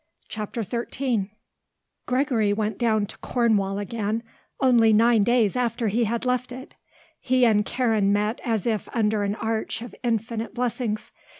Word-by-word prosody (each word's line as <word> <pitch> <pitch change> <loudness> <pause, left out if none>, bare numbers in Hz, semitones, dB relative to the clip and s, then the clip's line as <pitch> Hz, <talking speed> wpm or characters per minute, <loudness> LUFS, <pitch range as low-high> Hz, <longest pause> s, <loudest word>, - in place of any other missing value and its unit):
CHAPTER 215 +2 -4
XIII 235 -1 -2 0.8
Gregory 250 -5 +1
went 215 +1 -2
down 220 -3 +2
to - - -12
Cornwall 210 -5 +1
again 215 +2 -2 0.4
only 235 -4 +5
nine 225 0 +5
days 235 -1 +2
after 235 -2 0
he 230 +3 +1
had 235 +3 -2
left 250 0 0
it. 260 +3 -9 0.5
He 255 -1 +3
and 210 -3 +4
Karen 220 -5 +1
met 210 +3 0
as 225 -5 -1
if 220 -3 -1
under 215 -2 +1
an 205 0 -1
arch 220 0 -2
of 240 - -9
infinite 225 -1 -2
blessings. 240 -3 -2
225 Hz, 145 wpm, -24 LUFS, 210-240 Hz, 0.8 s, only